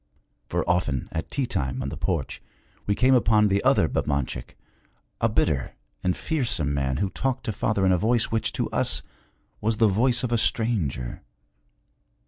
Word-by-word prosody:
For - - -1
often 90 -8 0
at 80 - -4
tea 140 - -1
time 65 - -2
on - - -3
the - - -6
porch - - -2 0.5
we 100 - +2
came 130 +3 +4
upon 110 -4 +4
the 100 +1 +1
other - - +4
Babanchik, 70 -4 -2 0.6
a - - +2
bitter 65 - 0 0.3
and 90 0 +1
fearsome 115 - -1
man 65 -2 -1
who 100 -1 -1
talked 130 0 -2
to 115 - -2
father 100 -1 0
in 95 - +4
a 90 - +3
voice 115 +2 +1
which, 115 -1 0
to - - -1
us, - - +1 0.6
was 110 +1 +1
the 115 - +5
voice 120 +5 +2
of 125 - -1
a 120 - +2
stranger. 100 - 0
105 Hz, 170 wpm, -25 LUFS, 75-120 Hz, 0.6 s, the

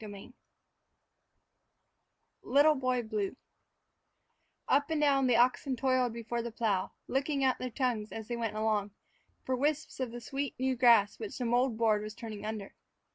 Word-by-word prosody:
III 205 +3 -10 2.1
"LITTLE 290 +3 +4
BOY 255 -3 0
BLUE" 215 -1 -3 1.3
UP 285 +2 +2
and 320 -1 0
down 275 -3 +3
the 245 - +3
oxen 255 +3 +2
toiled 255 -1 +1
before 235 +1 -4
the 235 - -4
plow, 215 -5 -1 0.2
licking 275 +1 0
out 260 -1 +2
their 255 - -3
tongues, 235 -4 -2
as 220 -1 -7
they 240 - -3
went 225 -2 -3
along, 215 -2 0 0.5
for 260 - -1
wisps 295 +3 -1
of 260 -2 -2
the 240 - -6
sweet, 270 +3 -4
new 260 0 +1
grass 230 -5 +4
which 435 - -6
the 250 - -2
mold 240 0 +1
board 220 -2 +2
was 215 0 -7
turning 220 -3 -7
under. 215 -2 -5
240 Hz, 160 wpm, -31 LUFS, 220-265 Hz, 2.1 s, LITTLE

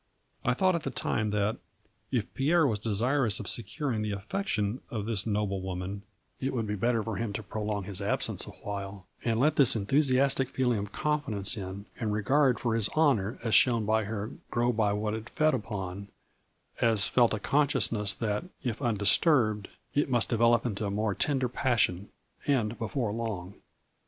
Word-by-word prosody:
I - - +1
thought 185 -1 +3
at 170 - -1
the 135 - -3
time 110 -3 -1
that, 105 +1 0 0.5
if 120 -5 -2
Pierre 160 +4 +3
was 110 -6 0
desirous 115 +2 +1
of 105 - -6
securing 120 +2 -1
the 105 -1 -2
affection 105 - -2
of 105 -3 -4
this 110 -2 -1
noble 105 -2 -1
woman, 95 +2 -5 0.4
it 135 +1 -2
would 115 -3 -1
be 105 - -3
better 115 +2 +1
for 110 -2 -4
him 115 -2 -3
to 110 - -4
prolong 105 0 -3
his 95 +1 -3
absence 100 - -1
a - - -7
while, 100 -1 -7 0.2
and 115 -1 0
let 150 +4 +2
this 135 -5 +7
enthu 110 +7 +2
siastic 135 -1 +3
feeling 125 -4 0
of 100 +1 -5
confidence 125 -9 -1
in, 100 0 -6
and 110 -3 -1
regard 130 +5 +2
for 120 -2 0
his 115 -2 +2
honor 130 -9 +2
as 115 -2 -1
shown 115 -4 +5
by 110 0 +1
her 105 +2 -4
' - - -40
grow 120 +1 +1
by 110 -2 +1
what 105 +1 -1
it 110 +1 -6
fed 155 0 +2
upon,' 100 -4 -4 0.7
as 110 -4 +4
felt 120 -3 +3
a - - -5
consciousness 115 -6 +1
that, 105 - -2 0.2
if 120 -4 -2
undis 105 -6 +3
turbed, 110 - +2 0.3
it 145 0 +1
must 120 -3 +3
develop 115 0 +3
into 105 -3 -2
a - - -2
more 105 +1 0
tender 135 +3 +1
passion, 115 -7 0 0.4
and 120 -6 +1
before 115 -1 -2
long. 105 -5 -4
110 Hz, 185 wpm, -29 LUFS, 105-125 Hz, 0.7 s, this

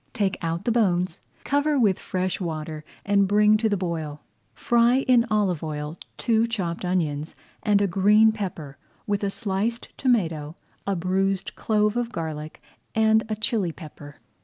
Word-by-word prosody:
Take 200 -5 0
out 165 0 -3
the 235 - +2
bones, 185 -7 +1 0.2
cover 285 +1 +1
with 210 -7 +3
fresh 185 0 -2
water, 155 -2 -4 0.2
and 200 -1 +3
bring 210 +1 +5
to 220 +1 +1
the 205 - +1
boil. 160 -5 -4 0.3
Fry 240 +2 +3
in 245 -2 +4
olive 200 -7 +1
oil 150 0 -4 0.2
two 230 0 +2
chopped 185 -8 -3
onions 160 -4 -1 0.3
and 205 -1 +3
a - - +2
green 210 +4 +5
pepper, 175 -10 -6 0.3
with 205 -1 -1
a 200 - +1
sliced 210 +4 -2
tomato, 165 - 0 0.3
a 200 - +1
bruised 190 +2 0
clove 210 0 +1
of 240 -1 -1
garlic, 155 -3 -6 0.3
and 220 0 +4
a 215 - -1
chilli 210 -4 0
pepper. 145 -3 -11
195 Hz, 155 wpm, -25 LUFS, 165-220 Hz, 0.3 s, bring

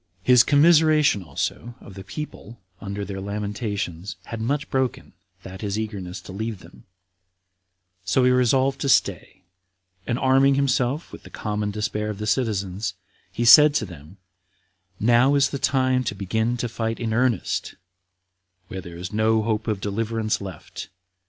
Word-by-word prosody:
His 125 -1 +6
commiseration 150 - +4
also 90 +9 -4
of 100 - -13
the 95 0 -9
people 120 0 -8 0.2
under 100 +1 -5
their 95 0 -6
lamentations 100 -3 -4
had 115 -1 -7
much 145 +5 -1
broken 130 -2 -2 0.3
that 95 0 -9
his 105 -1 -2
eagerness 100 -4 -5
to - - -11
leave 110 +2 -4
them; - - -17 1.2
so 100 +7 +2
he 125 - +4
resolved 130 +2 +2
to 140 - 0
stay, 95 -5 +1 0.6
and 120 - 0
arming 135 +1 +4
himself 135 +2 0
with - - -10
the - - -14
common 105 -1 -3
despair 105 0 -3
of 105 - -5
the 105 - -5
citizens, 100 -4 -1 0.4
he 120 +6 -2
said 150 +5 +8
to - - +1
them, 85 0 -13 0.8
"Now 120 +5 +4
is 140 -1 +3
the 140 - -4
time 130 -1 +1
to 105 - -2
begin 110 +5 -1
to 120 - -2
fight 115 0 -3
in 115 -2 -2
earnest, 120 -3 0 0.9
when 95 - -6
there 85 -1 -10
is 90 +3 -7
no 110 +1 +2
hope 110 0 -2
of 105 -3 -1
deliverance 110 +1 -2
left. 95 -5 -8
110 Hz, 155 wpm, -23 LUFS, 100-130 Hz, 1.2 s, said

